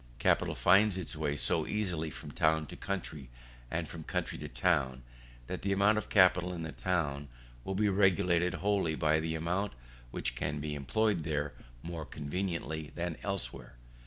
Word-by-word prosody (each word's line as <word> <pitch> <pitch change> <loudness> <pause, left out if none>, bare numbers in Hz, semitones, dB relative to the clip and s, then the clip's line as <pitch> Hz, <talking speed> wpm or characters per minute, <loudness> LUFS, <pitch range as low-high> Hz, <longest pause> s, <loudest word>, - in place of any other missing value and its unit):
Capital - - +2
finds 100 +2 +5
its 90 -4 -4
way 70 - -1
so - - 0
easily 90 -7 -1
from 75 0 -8
town 80 -1 +2
to - - -9
country 80 -9 -4 0.4
and 80 -1 -2
from 80 +1 -7
country - - -2
to - - -5
town, 65 +1 +1 0.4
that 90 +5 -5
the 100 - 0
amount 100 +2 +4
of 110 - -8
capital 90 -2 +5
in 85 -2 -4
the 80 - -4
town 75 -7 -1 0.4
will 95 - -3
be 105 +2 +3
regulated 95 -3 +3
wholly 100 -5 +1
by 80 0 +3
the 80 0 -2
amount 90 +5 -1 0.4
which - - -2
can 75 +4 -2
be 75 0 -3
employed 85 - +1
there 75 -2 -1 0.3
more 85 -1 -4
conveniently 80 +1 -3
than 85 -1 -2
elsewhere. 65 -11 -4
85 Hz, 165 wpm, -32 LUFS, 75-95 Hz, 0.4 s, finds